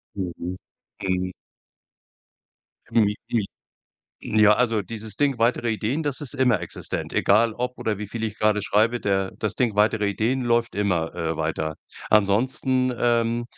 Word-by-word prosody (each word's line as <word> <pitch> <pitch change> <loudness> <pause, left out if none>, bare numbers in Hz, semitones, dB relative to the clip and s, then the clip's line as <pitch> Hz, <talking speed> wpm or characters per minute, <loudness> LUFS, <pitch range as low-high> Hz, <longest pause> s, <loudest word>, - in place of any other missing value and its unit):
Mhm. 95 -3 -3 0.7
Mhm. 90 -1 -1 1.6
I 105 -2 +3
i 110 -4 +1 1.0
ja, 105 0 +7
also, 115 -2 +1
dieses 105 +1 -6
Ding 140 -4 +1
weitere 120 0 +1
Ideen, 115 +8 -1
das 145 -2 -1
ist 145 -1 -1
immer 125 -7 +2
existent, 85 - -4
egal 110 +3 +3
ob 125 +2 -3
oder 105 -3 -2
wie 105 - -5
viel 115 +1 -4
ich 110 -1 -4
grade 105 -1 +2
schreibe, 110 +4 +2
der 95 -1 0
das 105 -2 -2
Ding 120 -4 0
weitere 105 0 +3
Ideen 115 +6 0
läuft 120 -1 +1
immer, 90 -6 0
äh, 80 -2 -2
weiter. 80 0 -2 0.4
Ansonsten, 130 +5 +2
ähm, 120 0 +1
110 Hz, 145 wpm, -24 LUFS, 100-120 Hz, 1.6 s, ja